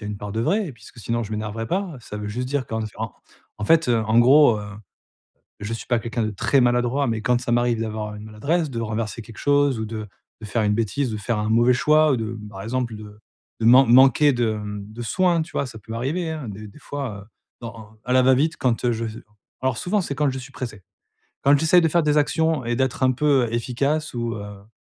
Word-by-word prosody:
y - - -6
a - - -5
une 105 - -4
part 100 0 -7
de 110 - -1
vrai, 195 - 0
puisque 115 +1 -16
sinon, 115 +1 -2
je 110 - -7
m'énerverai 110 +1 -4
pas. 185 -3 -2
Ça 105 -2 -8
veut 105 0 -5
juste 125 +4 -4
dire 140 -2 -1
qu'en 110 -1 -3
f - - -10
en - - -4 0.5
en 105 - -3
fait, 165 +2 +4
heu, 120 - +3
en 110 +2 +2
gros, 130 -2 +6
heu, 105 0 -7 0.9
je 105 +3 -4
suis 115 - -6
pas 120 -2 +2
quelqu'un 115 0 -2
de 110 - -1
très 130 +7 +1
maladroit, 125 +3 +2
mais 110 -1 -1
quand 125 +1 +1
ça 120 - -2
m'arrive 120 -1 +1
d'avoir 110 -1 -4
une 105 0 -9
maladresse, 140 +9 -1
de 115 -2 -4
renverser 110 +1 -3
quelque 115 0 -13
chose 145 -3 +2
ou - - -2
de 110 -1 -6 0.3
de 110 - -7
faire 110 +2 -1
une 105 0 +2
bêtise, 115 +4 -1
de 110 - -3
faire 105 +1 -2
un 105 - -2
mauvais 120 +3 +4
choix 155 +3 +4
ou - - +2
de, 115 0 -4
par 95 -1 -8
exemple, 120 0 -2
de 105 0 -12 0.4
de 110 - +1
man 130 +3 +7
manquer 135 +3 +6
de, 120 -3 0
mmh, 105 0 -7
de 120 +2 -7
soin, 175 +5 +1
tu 155 - -9
vois? 140 - -1
Ça 110 - -10
peut 110 +2 -10
m'arriver, 155 +9 -2
hein, 150 -7 -5
des 105 +1 -8
des 100 - -16
fois, 135 -9 -6
heu, - - -24 0.3
dans 115 -1 -7
en 110 0 -14
à 125 - -2
la 130 0 +5
va-vite, 135 +5 +3
quand 125 -2 0
heu, 120 - +3
je 115 0 -3
j 110 - -9 0.4
alors 130 -2 -1
souvent, 205 +8 0
c'est 145 -6 -4
quand 145 0 +1
je 130 - -5
suis 130 +1 -10
pressé. 110 -6 -7 0.6
Quand 140 +1 +5
j'essaie 160 +3 +5
de 165 - +2
faire 170 +1 +2
des 150 0 +2
actions 160 -2 +1
et 120 0 -1
d'être 130 0 0
un 130 - +4
peu 135 -3 +2
efficace 140 +6 -1
ou 120 -1 -2
heu 105 - -6
heu, 100 - -13
120 Hz, 250 wpm, -23 LUFS, 110-140 Hz, 0.9 s, man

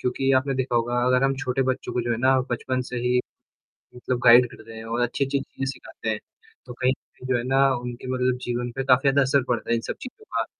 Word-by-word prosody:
क्योंकि 135 +2 0
आपने 135 +1 0
देखा 130 -2 -1
होगा 120 +1 +1
अगर 125 +1 +3
हम 135 0 +2
छोटे 135 0 -1
बच्चों 130 0 -2
को 125 - 0
जो 120 - -3
है - - 0
ना 130 +1 +4
बचपन 130 +2 -1
से 125 - -4
ही, 125 +1 +1 0.8
मतलब 125 0 -2
गाइड 120 +1 +8
करते 115 -1 -12
हैं 110 0 -8
और 115 +2 -2
अच्छी-अच्छी 135 +3 0
चीज़ें 135 - -6
सिखाते - - -7
हैं, - - -1 0.5
तो - - -8
कहीं 125 +1 +1
न - - +1 0.3
कहीं 130 - -8
जो 130 - +3
है 120 - -3
ना 135 +1 +4
उनके 120 +1 -6
मतलब 125 0 +1
जीवन 120 0 -2
पे 135 - -2
काफ़ी 130 -1 +4
ज़्यादा 140 +1 +3
असर 135 0 +2
पड़ता 120 -2 -2
है 115 - +3
इन 115 - -1
सब - - -5
चीज़ों 255 +12 -10
का। - - +1
125 Hz, 250 wpm, -24 LUFS, 120-135 Hz, 0.8 s, गाइड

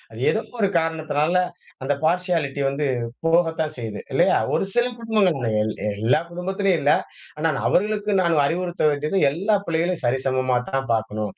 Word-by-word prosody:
அது 110 - -10
ஏதோ 220 - 0 0.2
ஒரு 200 - +4
காரணத்தினால, 160 +1 0 0.5
அந்த 145 - +1
பார்ஷியாலிட்டி 165 -5 0
வந்து 140 +2 -1 0.4
போகத்தான் 165 -2 +1
செய்யுது, 110 -4 -5
இல்லையா? - - +4 0.2
ஒரு - - +1
சில 240 0 +3
குடும்பங்கள்ல, 195 - +1
எல் 110 0 -1 0.3
எல்லா 125 +7 +3
குடும்பத்திலயும் 190 0 0
இல்லை. 145 +1 +4 0.4
ஆனால் 155 -2 0
அவர்களுக்கு 210 +2 +1
நான் 165 -4 +3
அறிவுறுத்த 175 +3 -2
வேண்டியது, 150 +5 -2
எல்லா 195 +8 +1
பிள்ளைகளையும் 170 0 -1
சரிசமமாத்தான் 130 0 0
பார்க்கணும். 110 -2 -2
160 Hz, 135 wpm, -23 LUFS, 135-180 Hz, 0.5 s, ஒரு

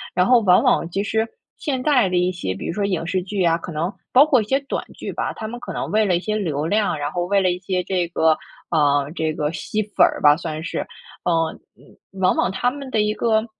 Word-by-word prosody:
然 180 - +3
后 250 +2 +6
往 185 0 +5
往 245 -10 +2
其 195 +3 -2
实 220 +2 0 0.3
现 270 -6 -2
在 255 -8 +4
的 180 - -1
一 180 +1 +2
些， 135 - -4
比 95 - -7
如 - - -2
说 205 - -2
影 185 -4 -1
视 185 +2 -1
剧 195 +1 -2
啊， 165 -1 +3
可 170 - -8
能 165 +6 -2 0.2
包 270 +3 +8
括 275 -6 +3
一 - - -4
些 265 +5 +1
短 275 - -4
剧 - - -6
吧， - - -2
他 220 - -7
们 240 +2 -7
可 - - -7
能 - - -3
为 215 0 +3
了 185 -3 +2
一 - - +1
些 215 +2 -2
流 155 -7 -2
量， 205 0 +1
然 145 0 -3
后 175 +1 -2
为 200 +2 +2
了 185 -1 +2
一 180 - -3
些 185 0 -2
这 180 -2 -1
个， 160 -2 +2 0.4
嗯， 145 -1 +2
这 160 -2 -1
个 150 0 -2
吸 215 +5 -2
粉 210 0 +3
儿 - - -1
吧 145 0 +7
算 160 -2 -5
是。 - - -4 0.4
嗯， 165 -2 +1 0.2
嗯， - - -21 0.2
往 185 - +4
往 - - +2
他 245 +6 0
们 275 0 -8
的 220 -4 +1
一 210 0 +1
个， 220 -1 +1
185 Hz, 280 characters per minute, -21 LUFS, 165-220 Hz, 0.4 s, 包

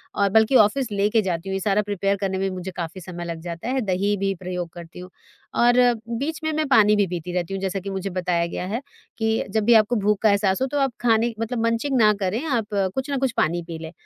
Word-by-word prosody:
और 200 -1 +2
बल्कि 220 +5 +3
ऑफिस 235 +2 +3
लेके 210 +2 +2
जाती 185 -2 -3
हूँ। - - -2
ये 195 - -1
सारा 200 +2 +1
प्रिपेयर 200 -1 -1
करने 190 -1 -1
में 195 0 -1
भी 185 - -6
मुझे 185 +1 -5
काफ़ी 175 +2 -5
समय 175 0 -7
लग 170 -1 -5
जाता 170 +3 -6
है। 260 0 0
दही 200 +2 +1
भी 195 0 0
प्रयोग 180 -2 -4
करती 170 0 -11
हूँ, 180 0 -9 0.5
और 240 0 +4 0.5
बीच 315 +4 -3
में 315 - 0
मैं 310 0 0
पानी 210 -6 +5
भी 205 -1 +3
पीती 175 0 -5
रहती 180 +1 -2
हूँ, 195 - -3
जैसा 195 0 -2
कि 195 +1 -7
मुझे 195 0 -3
बताया 180 -2 0
गया 175 - -5
है 225 +7 -3 0.4
कि 220 0 0
जब 215 +2 0
भी 235 - +6
आपको 220 +2 +4
भूख 210 -1 +1
का 220 - +4
एहसास 200 +1 +2
हो, 265 - +2
तो 290 +2 -3
आप 270 -2 +1
खाने 230 0 +2
मतलब 230 +1 -2
मंचिंग 230 +4 0
ना 215 -2 +6
करें, 195 +8 -1
आप 245 -8 0 0.3
कुछ 265 +2 -3
ना 280 - 0
कुछ 265 -2 0
पानी 175 +2 +1
पी 165 -2 -6
लें। 160 0 -8
200 Hz, 255 wpm, -23 LUFS, 185-230 Hz, 0.5 s, भी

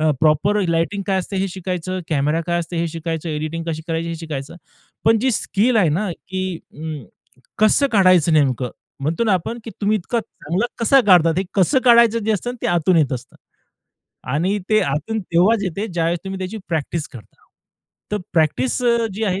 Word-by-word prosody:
अ, 155 0 +3
proper 160 +7 +3
lighting 170 +5 0
काय 195 -2 +1
असते 190 +2 -4
हे 195 +1 0
शिकायचं, 185 0 -4
कॅमेरा 150 +1 +1
काय 175 0 0
असते 170 +1 -6
हे 170 0 0
शिकायचं, 165 0 -4
एडिटिंग 155 +2 -3
कशी 160 -1 -3
करायची 165 0 -2
हे 165 - -3
शिकायचं. 155 -2 -6 0.5
पण 225 0 +5
जी 260 - +2
स्किल 225 +4 +1
आहे 190 -6 +4
ना, 185 +5 -1
की 185 -1 -5 0.2
अ, 150 - -12 0.8
कसं 215 +6 +4
काढायचं? 185 -5 +5
नेमकं 130 -5 +2 0.3
म्हणतो 160 +10 0
ना 210 - +2
आपण, 185 +6 -1
की 225 - -7
तुम्ही 210 +1 +2
इतका 230 +6 -2
चांगला 200 -1 -3
कसा 265 +4 +5
काढतात, 170 -4 +5
हे 190 - 0
कसं 210 - +3
काढायचं 235 -2 +6
जे 220 - +2
असतं 240 +4 -2
ते - - 0
आतून 175 +1 +2
येत 145 -5 +2
असतं. 125 0 -6 1.0
आणि 185 +8 +1
ते 215 - +5
आतून 160 +10 -2
तेव्हाच 190 +5 +2
येतं, 195 +3 -4
ज्यावेळेस 170 0 0
तुम्ही 190 0 -5
त्याची 190 +3 -5
प्रॅक्टिस 160 -1 -2
करता. 120 -4 -15 0.7
तर - - +2 0.2
प्रॅक्टिस, 150 - +1
अ, 235 -1 +3
जी 220 +2 -2
आहे 190 -1 0
180 Hz, 185 wpm, -20 LUFS, 160-210 Hz, 1.0 s, काढायचं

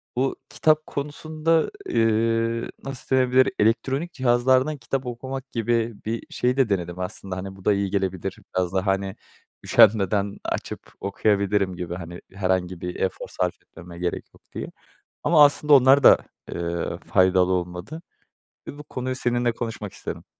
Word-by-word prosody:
bu 130 +2 0
kitap 155 0 +2
konusunda, 155 +3 -1
eee, 115 +1 +1
nasıl 135 -1 -3
denebilir? 130 0 +4
Elektronik 135 +9 +1
cihazlardan 130 +3 +2
kitap 130 +1 -3
okumak 130 +2 -6
gibi 115 0 0
bir 115 +1 -3
şeyi 125 +1 0
de 130 -4 +3
denedim 90 -3 -2
aslında. 90 0 -5
Hani, 95 +1 -6
bu 95 - -16
da 105 - +4
iyi 100 -1 -1
gelebilir 95 -1 -2 0.2
biraz 90 -1 0
daha, 95 +1 0
hani, 95 0 0 0.5
üşenmeden 100 -1 +4
açıp - - -5
okuyabilirim 100 -1 +1
gibi, 85 -1 -5
hani, 85 -1 -8
herhangi 95 -2 -1
bir 90 0 -4
efor 95 - -2
sarf - - -1
etmeme 85 0 -12
gerek 90 -1 -2
yok - - -21
diye. - - -5 0.5
Ama 155 -3 +7
aslında 145 +1 +4
onlar 135 +1 +6
da, - - +9 0.3
eee, 85 0 -3
faydalı 95 0 +3
olmadı 90 - -4 0.7
ve 145 - -8
bu 150 - -9
konuyu 130 -2 -4
seninle 120 -1 +1
konuşmak 115 -3 -5
istedim. - - -7
110 Hz, 145 wpm, -24 LUFS, 95-130 Hz, 0.7 s, da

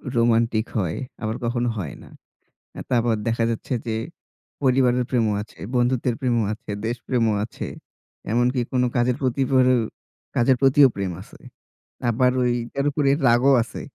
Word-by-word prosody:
Romantic 115 -1 +2
হয়, 90 -6 -1 0.2
আবার 110 0 -2
কখনো 120 +1 0
হয় 85 -9 -5
না। - - -14 0.7
আ - - -4
তারপর 120 -2 +2
দেখা 115 0 +1
যাচ্ছে 115 +3 -4
যে 115 - -1 0.7
পরিবারের 125 -1 +3
প্রেমও 115 -4 +1
আছে, 105 - -16 0.2
বন্ধুত্বের 125 -1 +1
প্রেমও 120 -4 +1
আছে, 110 - -9 0.2
দেশ 120 +2 -1
প্রেমও 115 -4 +1
আছে। 115 - -7 0.7
এমনকি 125 +2 +2
কোন 125 -1 +2
কাজের 120 0 +2
প্রতি 130 +1 0
পরে 130 -1 +5 0.6
কাজের 130 +2 +4
প্রতিও 135 +1 +6
প্রেম 95 -2 -2
আছে। - - -16 0.7
আবার 125 +2 +3
ওই 120 -1 +2 0.3
এর 140 - +1
উপরে 140 -1 +1 0.2
রাগও 120 +4 +5
আছে। 120 - -9
120 Hz, 150 wpm, -23 LUFS, 115-130 Hz, 0.7 s, প্রতিও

